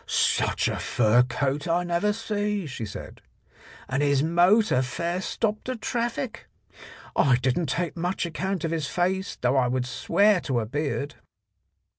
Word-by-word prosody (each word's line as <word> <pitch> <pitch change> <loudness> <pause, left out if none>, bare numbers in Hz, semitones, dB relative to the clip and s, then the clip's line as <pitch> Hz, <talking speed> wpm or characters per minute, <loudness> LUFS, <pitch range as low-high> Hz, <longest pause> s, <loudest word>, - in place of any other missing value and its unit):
"Such - - +1
a - - -1
fur 120 +1 +3
coat 135 +4 -1
I 170 +1 +1
never 175 +4 +1
see," 210 -2 -2
she 125 -6 -5
said, 100 - -9 0.7
"and 130 +2 -1
his 140 -1 +3
motor 175 - +4
fair 170 +8 -2
stopped 215 +2 -2
the 255 - -2
traffic. 235 +1 -3 0.7
I 135 -4 +4
didn't 130 +6 0
take 175 -1 -1
much 175 +2 -1
account 180 +2 -3
of 165 - -1
his 160 -3 -1
face, 190 +4 -1
though 125 +2 +2
I 125 -2 +3
would 125 0 -1
swear 200 +10 +2
to 130 -4 -1
a 110 - -2
beard." 145 +3 -3
170 Hz, 155 wpm, -26 LUFS, 135-195 Hz, 0.7 s, motor